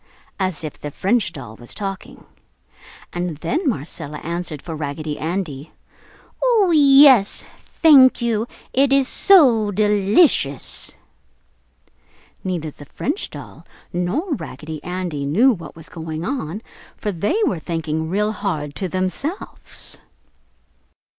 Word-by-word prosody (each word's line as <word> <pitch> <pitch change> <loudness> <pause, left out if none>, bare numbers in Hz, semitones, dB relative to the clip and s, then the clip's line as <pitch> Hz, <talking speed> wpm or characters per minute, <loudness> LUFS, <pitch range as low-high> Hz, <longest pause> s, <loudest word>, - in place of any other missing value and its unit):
as 185 -5 -2
if 155 - -6
the 150 - -5
French 195 +5 0
doll 135 -10 -9
was 120 - -9
talking. 195 -2 -6 0.9
And 175 -3 -3
then 305 - -1
Marcella 150 - -4
answered 170 -2 -4
for 165 +2 -7
Raggedy 150 0 -4
Andy, 160 -4 -4 0.7
"Oh, 450 -7 +4
yes, 275 -7 +6
thank 275 -6 +5
you! 230 -2 0 0.3
It 270 +1 +3
is 275 -1 +4
so 255 - +5
delicious!" 205 - +2 1.5
Neither 170 -5 -3
the 145 - -13
French 290 - -3
doll - - -11 0.3
nor 205 - -1
Raggedy 155 - -7
Andy 180 -5 -3
knew 205 - +4
what 180 -8 -7
was 160 -1 -12
going 160 0 -6
on, 220 - -4 0.3
for 210 - -2
they 200 - -1
were 180 - -1
thinking 160 -1 -3
real 210 +4 +1
hard 160 -9 -3
to 190 - -2
themselves. 185 - -4
185 Hz, 120 wpm, -21 LUFS, 155-245 Hz, 1.5 s, yes